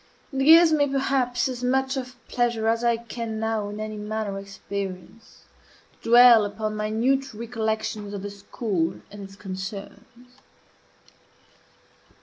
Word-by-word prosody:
It 270 0 0
gives 325 +2 +7
me, 290 -2 +3
perhaps, 270 -3 0
as 250 -1 -5
much 265 +2 +1
of 255 -1 -5
pleasure 235 -2 0
as 230 +1 +1
I 235 -1 +3
can 230 -1 -6
now 220 -2 -1
in 210 +1 -7
any 215 0 -5
manner 210 -1 -4
experience 195 +1 -8 0.6
to - - -6
dwell 240 -2 +8
upon 215 +1 -3
minute 225 +5 0
recollections 220 -2 -3
of 200 -1 -6
the 205 - -5
school 200 -4 -2 0.2
and 205 0 -9
its 195 0 -13
concerns. 205 +6 -9
225 Hz, 135 wpm, -25 LUFS, 205-250 Hz, 0.6 s, dwell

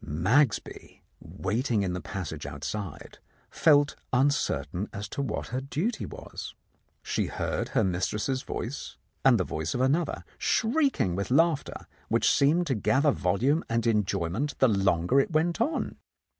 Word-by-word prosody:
Magsby, 105 - 0 0.2
waiting 110 +2 -1
in 90 -2 -1
the 90 - -4
passage 80 -7 -5
outside, 80 +8 -6 0.3
felt 145 -3 +4 0.2
un 130 +3 +4
certain 90 - -2
as 100 +1 -5
to 140 - -3
what 125 -6 -3
her 130 +2 -2
duty 165 - -2
was. - - -8 0.5
She - - -1
heard - - -2
her - - +4
mis 90 -1 0
tress's 130 +5 -2
voice 130 +1 -5 0.3
and 125 -4 +5
the - - +2
voice 80 -2 -3
of 125 - 0
another, 150 +5 +1 0.2
shrieking 235 - +1
with 100 +1 -3
laughter, 155 +2 +1 0.2
which - - +3
seemed 155 +6 +3
to 145 - 0
gather 135 +6 +2
volume 130 - +1
and 115 0 0
enjoy 105 -7 +1
ment 135 - -2
the 130 - +5
longer 95 +3 +2
it 135 - +2
went 170 +5 +1
on. 305 +8 -1
125 Hz, 155 wpm, -28 LUFS, 95-145 Hz, 0.5 s, and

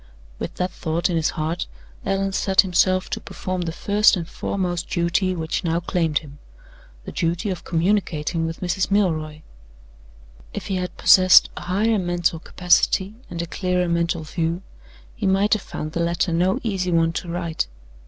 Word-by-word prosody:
With - - -5
that 180 0 -2
thought 170 +1 -1
in - - 0
his 160 -1 +1
heart, 160 +3 -2 0.4
Allan 195 0 0
set 190 0 +4
himself 185 0 +2
to - - -2
perform 185 -1 -4
the 170 -1 -2
first 205 +6 +3
and 170 -2 -4
foremost 175 -2 -3
duty 175 +2 +1
which 160 +1 -2
now 165 -1 +1
claimed 165 -3 0
him 145 0 -13 0.7
the - - -6
duty 170 +3 -1
of 180 - -5
communicating 170 -2 0
with 165 - -6
Mrs. 185 +1 0
Milroy. 155 -7 0 1.1
If - - -5
he 190 - -2
had 180 0 -4
possessed 185 -1 +7
a - - -7
higher 210 +4 +1
mental 175 -2 0
capacity 185 +3 +2 0.2
and 170 -1 -4
a - - -3
clearer 180 +1 -1
mental 170 0 0
view, 165 +3 -2 0.5
he 215 -5 -2
might 195 +2 +3
have 215 - +1
found 155 -4 -6
the 170 - -3
letter 170 +1 0
no 180 +3 +2
easy 190 -5 -1
one 165 -1 +2
to 170 - -4
write. 170 - -2
175 Hz, 170 wpm, -22 LUFS, 165-190 Hz, 1.1 s, possessed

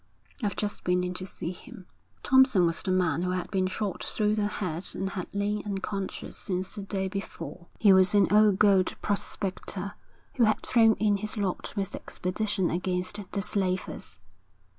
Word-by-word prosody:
'I've 205 - 0
just 210 -1 -3
been 180 0 +2
in 180 0 -2
to 185 +1 -4
see 170 - -5
him.' 185 +1 -12 0.4
Thompson 260 -9 +5
was 165 -1 0
the 195 - -4
man 180 -4 +2
who 180 - -1
had 180 -1 -2
been 190 -1 +1
shot 190 0 -3
through 210 -1 0
the 210 -1 +1
head 180 -4 -3
and 195 0 -2
had 185 -2 -4
lain 205 +1 -1
unconscious 195 -1 -4
since 185 -1 -3
the 210 - -6
day 195 -1 -2
before. 185 -2 -6
He 205 -3 +6
was 190 +2 +5
an 200 -2 +5
old 210 -2 +6
gold 195 -3 +4
prospector, 200 -1 -2 0.4
who 240 - +5
had 215 - +2
thrown 225 -3 +4
in 210 -1 +2
his 215 +2 -3
lot 195 -1 -2
with 195 -2 -2
the - - -5
expedition 190 0 -1
against 180 +3 -1
the 200 - -1
slavers. 185 -2 -2
195 Hz, 180 wpm, -28 LUFS, 185-210 Hz, 0.4 s, He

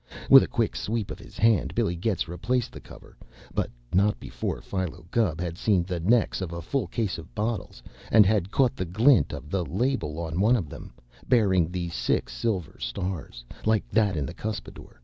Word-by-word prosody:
With - - +11
a - - -1
quick - - -1
sweep 110 -1 -2
of - - -7
his - - -13
hand 110 -2 +3
Billy 85 - +1
Getz 90 +1 -1
replaced 115 +9 -1
the - - -9
cover, - - -14 0.4
but - - -1 0.2
not 100 +3 +3
before - - -4
Philo 90 -4 -4
Gubb 95 -9 +1
had 85 -1 -4
seen 100 -5 +2
the 90 -1 -3
necks 110 +4 +2
of 90 -3 -4
a 85 - -5
full 110 - -2
case 100 -1 -2
of 80 - -13
bottles 110 +1 -3 0.3
and 110 -2 +7
had 100 -2 +2
caught 130 +2 +2
the 95 - -3
glint 105 - +4
of 75 - -8
the 95 -2 0
label 85 - -1
on 85 0 -3
one 115 +5 +5
of 90 -11 -2
them, - - -10 0.4
bearing 95 -9 +4
the 90 -1 -3
six - - -1
silver 90 - -2
stars, 90 -11 -5 0.2
like 110 -2 +1
that 105 -4 +2
in 75 - -1
the - - -6
cuspidor. 110 -1 -7
95 Hz, 195 wpm, -26 LUFS, 85-110 Hz, 0.4 s, With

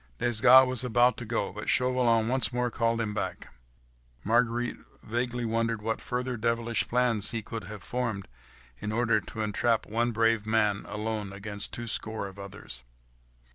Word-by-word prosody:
Desgas 120 - +6
was 130 -1 -2
about 120 0 +3
to 120 - -6
go, 110 -4 -2
but 105 +1 -5
Chauvelin 125 -3 +3
once 130 0 +1
more 125 0 -1
called 115 0 0
him 110 -2 -1
back. - - -4 0.7
Marguerite 120 +2 +1 0.3
vaguely 120 +1 -2
wondered 115 0 0
what 110 0 -2
further 125 0 -3
devilish 115 0 0
plans 120 -4 +1
he 115 -2 -3
could 110 -1 -6
have 105 -1 -8
formed, 120 -6 -3 0.5
in 105 - -4
order 115 -1 +2
to 110 +4 -6
entrap 110 +2 +1
one 120 +2 0
brave 115 -1 +2
man, 105 -2 +1
alone, 105 -1 -3
against 100 +1 -3
two 120 - -5
score 110 -2 -1
of 95 +1 -12
others. 100 -11 -9
115 Hz, 160 wpm, -28 LUFS, 105-120 Hz, 0.7 s, Desgas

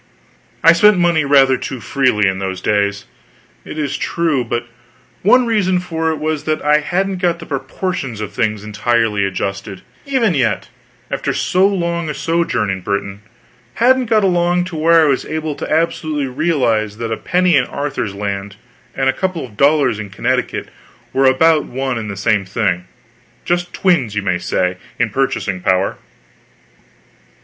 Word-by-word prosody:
I 165 - +8
spent 210 +3 +5
money 170 -4 +2
rather 135 -2 +5
too 130 +1 -5
freely 120 -5 +1
in 95 0 -1
those 95 -1 -3
days, 100 -1 0 0.6
it - - -8
is 150 -3 -2
true; 160 -7 0
but 120 0 -3 0.6
one 250 +6 +5
reason 200 -5 +1
for 165 -2 -2
it 160 - 0
was 155 0 -3
that 155 0 0
I 150 0 +5
hadn't 185 +5 -1
got 175 -2 +1
the 170 - -10
proportions 140 - -4
of 105 -1 -5
things 110 -2 -1
entirely 105 -1 0
adjusted, 100 0 -4 0.2
even 250 -8 +2
yet, 125 -7 0 0.4
after - - -1
so 185 +2 +2
long 170 -4 -1
a 150 - -3
sojourn 165 - 0
in 95 -1 -4
Britain 100 +1 -3 0.5
hadn't 255 +1 +3
got 215 -2 +3
along 175 -1 +2
to 180 -2 -7
where 165 +1 +4
I - - +3
was 135 -2 +1
able 155 -1 -3
to - - -6
absolutely 155 -2 0
realize 125 -7 0
that 115 0 -4
a - - 0
penny 180 -1 +2
in 130 -3 +3
Arthur's 135 -9 -4
land 100 0 -4 0.4
and 135 - 0
a 130 - +3
couple 185 +1 -2
of 115 -5 -15
dollars 140 -3 +3
in 105 -2 -6
Connecticut 95 - -2 0.4
were 135 0 +3
about 155 +4 +4
one 130 -1 -3
and 110 -1 -5
the 100 - -6
same 105 0 +1
thing: 95 -2 -1 0.6
just 175 0 -1
twins, 160 - +1
as - - -8
you 100 - -1
may 95 -2 0
say, 90 +1 -1 0.2
in 120 -3 0
purchasing 100 -7 -1
power. 95 +1 +1
135 Hz, 170 wpm, -17 LUFS, 105-170 Hz, 0.6 s, I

